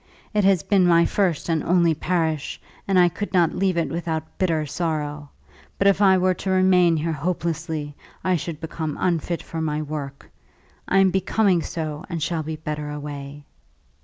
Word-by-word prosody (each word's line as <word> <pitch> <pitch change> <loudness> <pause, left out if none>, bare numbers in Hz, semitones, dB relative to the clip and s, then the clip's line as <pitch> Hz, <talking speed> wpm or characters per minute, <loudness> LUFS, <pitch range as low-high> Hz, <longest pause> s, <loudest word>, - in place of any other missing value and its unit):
It 210 -1 +2
has 190 -5 +4
been 190 -3 +3
my 170 -1 +5
first 185 -7 0
and 160 -3 0
only 170 -2 +3
parish, 160 -2 -1 0.3
and 195 -1 +2
I 180 -1 +6
could 200 +4 -4
not 170 -3 +3
leave 185 -2 0
it 165 - 0
without 160 -2 -4
bitter 165 -5 +1
sorrow. 150 -2 -3 0.5
But 195 - 0
if 200 0 +4
I 190 -2 +6
were 185 0 +2
to 190 - -5
remain 185 -3 +4
here 160 +2 -1
hopelessly, 160 -1 -3 0.3
I 185 -1 +2
should 165 -1 -4
become 160 -2 -4
unfit 170 -1 -1
for 165 - -5
my 150 -1 -1
work. 145 -2 -6 0.6
I 195 - +2
am 195 -1 +5
becoming 190 0 +2
so, 155 -2 -4
and 165 -3 -3
shall 165 0 -1
be 155 +1 -4
better 150 -1 -5
away." 145 -1 -7
165 Hz, 175 wpm, -23 LUFS, 155-185 Hz, 0.6 s, I